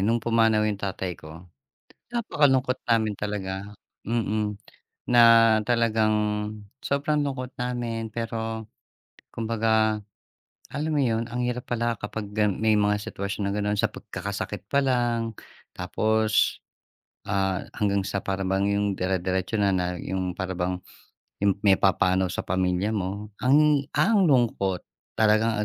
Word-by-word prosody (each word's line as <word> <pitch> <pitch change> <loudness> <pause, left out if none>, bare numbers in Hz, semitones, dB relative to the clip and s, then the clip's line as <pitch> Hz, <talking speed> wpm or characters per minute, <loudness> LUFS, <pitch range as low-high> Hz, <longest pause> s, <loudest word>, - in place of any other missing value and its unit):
nung 115 +4 +2
pumanaw 115 -2 +3
yung 105 -2 -1
tatay 95 -2 -3
ko. 80 0 -12 0.7
Napakalungkot 140 - +1
namin 110 -2 +2
talaga, 100 -1 -4 0.3
mm. 105 -2 -1 0.5
Na 120 -1 +6 0.4
talagang 115 -3 +2 0.7
sobrang 145 +2 +1
lungkot 130 -2 -3
namin. 120 -2 -3
Pero 115 -1 -3 0.7
kumabaga, 110 -1 +1 0.7
alam 150 +2 -3
mo 145 - +2
yon, 115 -3 +1
ang 125 +1 -3
hirap 125 0 -4
pala 120 -2 0
kapag 105 0 -5
gan 105 -2 +1
may 110 -1 +4
mga 105 0 +2
situwasyon 100 0 -3
na - - -2
gano'n, 105 0 -1
sa 110 0 +2
pagkakasakit 100 -1 -6
pa 140 - +3
lang. 120 -3 0 0.4
Tapos, 110 0 +1 0.7
ah, 95 -1 0
hanggang 100 -1 +1
sa 100 -1 -2
para 95 -1 -2
bang 95 +1 +1
yung 100 0 +1
dirediretso 95 +2 -1
na 100 -1 +3
na 90 -1 -1
yung 95 -1 -3
para 95 -1 -4
bang, 90 +1 -2 0.7
yung 100 -1 +3
may 100 -2 +6
papanaw 95 -1 +3
sa - - -3
pamilya 95 +2 0
mo, 100 +1 -3
ang 145 +2 +4
ang 205 -6 +4
lungkot! 110 -8 +1 0.3
Parang 110 0 +3
105 Hz, 130 wpm, -25 LUFS, 100-115 Hz, 0.7 s, Na